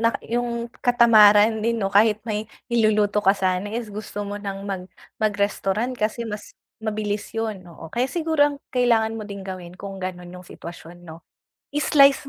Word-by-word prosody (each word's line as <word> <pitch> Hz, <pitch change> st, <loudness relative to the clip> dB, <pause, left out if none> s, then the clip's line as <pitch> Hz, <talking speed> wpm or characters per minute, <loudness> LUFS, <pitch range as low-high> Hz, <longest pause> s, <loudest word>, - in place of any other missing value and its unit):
na 230 Hz, 0 st, +2 dB
yung 235 Hz, 0 st, -2 dB
katamaran 220 Hz, -3 st, +6 dB
din 230 Hz, 0 st, +1 dB
'no. 195 Hz, -1 st, -1 dB
Kahit 210 Hz, +1 st, +5 dB
may 215 Hz, 0 st, -3 dB, 0.2 s
iluluto 210 Hz, -2 st, +3 dB
ka 195 Hz, +1 st, +4 dB
sana 185 Hz, +1 st, 0 dB
is 225 Hz, -2 st, -4 dB
gusto 205 Hz, 0 st, -5 dB
mo 205 Hz, 0 st, -5 dB
ng 195 Hz, -1 st, -5 dB
mag 190 Hz, -2 st, -3 dB, 0.4 s
mag-restaurant 205 Hz, +3 st, 0 dB
kasi 230 Hz, +1 st, -2 dB
mas 210 Hz, -1 st, -7 dB, 0.2 s
mabilis 210 Hz, -1 st, -2 dB
yun, 220 Hz, -4 st, -3 dB
oo. 165 Hz, -1 st, -11 dB
Kaya 245 Hz, +2 st, 0 dB
siguro 310 Hz, -2 st, +1 dB
ang -, -, -10 dB
kailangan 225 Hz, -3 st, +2 dB
mo 210 Hz, -, -6 dB
din 200 Hz, -1 st, -7 dB
gawin 185 Hz, -2 st, -7 dB
kung 195 Hz, 0 st, -7 dB
ganun 180 Hz, -1 st, -6 dB
yung 180 Hz, -1 st, -11 dB
sitwasyon 175 Hz, +1 st, -11 dB
'no, 160 Hz, +1 st, -11 dB, 0.5 s
i-slice 275 Hz, -1 st, +4 dB
210 Hz, 165 wpm, -23 LUFS, 195-230 Hz, 0.5 s, katamaran